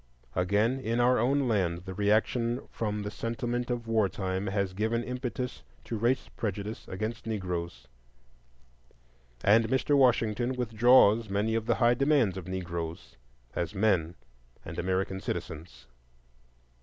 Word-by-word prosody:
Again, 105 +8 +2
in 115 -2 -1
our 125 0 +4
own 135 +3 +2
land, 90 -6 0
the 95 - -6
reaction 110 +5 +1
from 105 -2 -3
the 105 - -4
sentiment 120 +2 -3
of 120 -1 -2
war 110 -3 +2
time 95 +1 -3
has 100 -1 -1
given 110 +4 0
impetus 125 0 -4 0.2
to 115 - -4
race 120 +4 +1
prejudice 105 0 -4
against 110 +5 -4
Negroes, 85 - -4 1.6
and 110 +3 +5
Mr. 130 +3 +2
Washington 120 -2 +2
withdraws 115 -2 +4
many 105 +3 0
of 115 0 -1
the 120 - +3
high 120 -1 +4
demands 135 -6 +2
of 95 -2 -7
Negroes 85 -3 -5 0.4
as 85 +4 -2
men 95 -5 +1 0.5
and - - -6
American 95 +1 -1
citizens. 75 -5 -6
110 Hz, 130 wpm, -29 LUFS, 95-120 Hz, 1.6 s, and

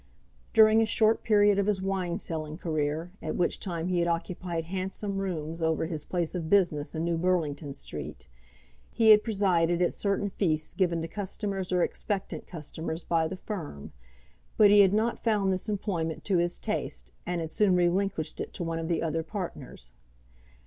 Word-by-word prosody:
During 220 0 +7
a - - +4
short 220 0 +3
period 205 -2 +4
of 200 - +1
his 205 -2 +2
wine 190 -2 -1
selling 155 -1 -4
career, 155 0 -2
at 155 - -3
which 175 - 0
time 170 -3 -3
he 180 -1 +1
had 170 - +1
occupied 170 0 -2
handsome 195 +2 -3
rooms 165 -4 -3
over 160 0 +1
his 160 -3 -4
place 175 -1 -2
of 165 -3 -3
business 170 -7 +2
in 160 +1 -1
New 170 -1 0
Burlington 165 -5 0
Street, 135 - -7 0.6
he 225 -2 +5
had 210 0 +7
presided 180 -6 +2
at 180 - +2
certain 200 0 -1
feasts 155 -6 -1
given 170 -4 +1
to - - -3
customers 195 0 -4
or 180 -1 +3
expectant 200 -3 -3
customers 160 0 -6
by 165 -1 +1
the 185 - -6
firm; 165 - -6 0.7
but 205 -1 +7
he 205 - +7
had 195 -2 +7
not 220 +3 0
found 205 -4 +2
this 185 +4 -4
employment 180 -6 -2
to 190 -4 +2
his 175 0 0
taste, - - -4 0.2
and 175 -1 -1
had 160 -1 -4
soon 200 -1 +3
relinquished 175 -2 0
it - - -6
to - - -4
one 165 -1 -2
of 165 - -3
the 165 -1 0
other 165 0 0
partners. 160 - -7
175 Hz, 180 wpm, -28 LUFS, 160-195 Hz, 0.7 s, During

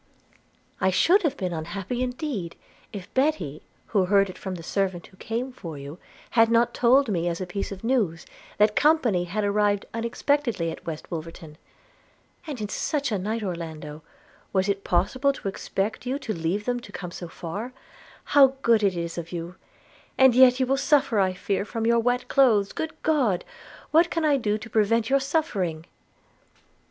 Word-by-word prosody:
'I 190 - +3
should 350 - +4
have 290 -4 -1
been 180 -3 -2
unhappy 195 +9 -4
indeed, 250 - -3 0.4
if 195 -4 -9
Betty, 225 - 0 0.3
who 195 -4 +2
heard 195 0 +3
it - - -15
from 190 -1 -5
the 170 - -9
servant 190 -1 -1
who 185 - -19
came 235 +6 -3
for 165 - -8
you, 140 +5 -9 0.3
had 225 -1 +5
not 235 +1 +3
told 260 +3 +4
me 175 -5 -1
as 170 -1 -2
a 185 - -3
piece 195 +3 -4
of 195 +1 -8
news, 215 -10 0 0.3
that 210 0 +3
company 255 - +3
had 205 +5 -2
arrived 205 0 +1
unexpectedly 235 - 0
at 160 - -11
West 160 -2 -6
Wolverton. 165 -1 -7 0.5
– - - -30
And 285 -5 -5
in 210 -1 -4
such 285 +1 -1
a 205 - 0
night, 215 +4 -2
Orlando, 160 -4 -6 0.5
was 190 0 +1
it 200 -1 -1
possible 255 +11 +1
to 240 - -7
expect 200 +4 -3
you 260 +2 0
could 215 - -5
leave 180 +6 -1
them 245 -1 0
to 235 - -13
come 180 -3 -7
so 175 - -7
far? 190 +9 -6 0.5
How 270 -2 +5
good 230 -2 +4
it 195 -3 +1
is 170 0 -3
of 165 0 -8
you! 170 0 -5 0.3
– - - -29
and 265 -2 +6
yet 255 +1 +6
you 260 - +3
will 270 +2 +1
suffer, 275 -6 +2
I 190 -1 +2
fear, 195 +2 -1
from 225 +2 -4
your 235 0 +4
wet 245 +2 0
clothes. 225 -8 +3
Good 320 0 -5
God! 260 - +1 0.5
what 335 +2 +5
can 330 -2 -1
I 290 -2 +4
do 215 -4 0
to 220 - -9
prevent 230 +2 +1
your 275 - +5
suffering?' 210 - -1
210 Hz, 185 wpm, -25 LUFS, 180-255 Hz, 0.5 s, and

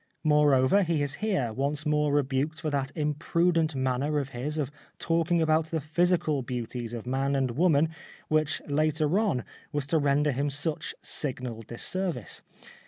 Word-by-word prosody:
Moreover, 150 +2 +4
he 165 -5 +1
is 145 -1 -2
here 185 - 0
once 145 +4 -1
more 150 -1 +2
rebuked 145 +2 0
for 155 -2 -2
that 140 -1 -1
imprudent 160 +1 +1
manner 130 +3 0
of 140 -2 -1
his 135 +5 -4
of 145 -3 -1 0.3
talking 165 0 +1
about 155 0 +2
the 160 0 -1
physical 160 -1 +1
beauties 120 -1 -4
of 115 - -6
man 135 +2 0
and 130 -2 +1
woman 160 +2 +3 0.4
which 155 -1 +1
later 155 +4 +2
on 200 - +1 0.3
was 145 -1 -1
to 160 +3 +2
render 145 +1 +2
him 140 +3 0
such 145 +2 -2
signal 125 -5 -4
disservice. 125 - -2
150 Hz, 155 wpm, -28 LUFS, 135-160 Hz, 0.4 s, Moreover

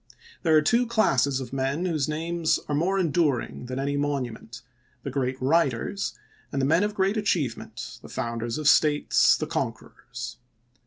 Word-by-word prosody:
There 160 -3 +4
are 155 - +4
two 235 +9 +3
classes 140 - +2
of 130 0 -7
men 135 +6 -1
whose 155 -5 0
names 165 +1 0
are 150 - -2
more 175 +7 +1
enduring 155 -8 0
than 130 +1 -4
any 140 +1 -1
monument 125 -5 -3 0.2
— 125 0 -38
the 140 - -4
great 130 -1 -2
writers; 140 - 0 0.4
and 140 - -2
the 135 - +2
men 165 +7 +3
of 210 0 -2
great 195 +2 +1
achievement, 170 - -2
the - - -12
founders 115 +1 -3
of 155 -2 -1
states, 150 0 +4
the - - -2
conquerors. 115 -2 -5
145 Hz, 165 wpm, -26 LUFS, 130-170 Hz, 0.4 s, There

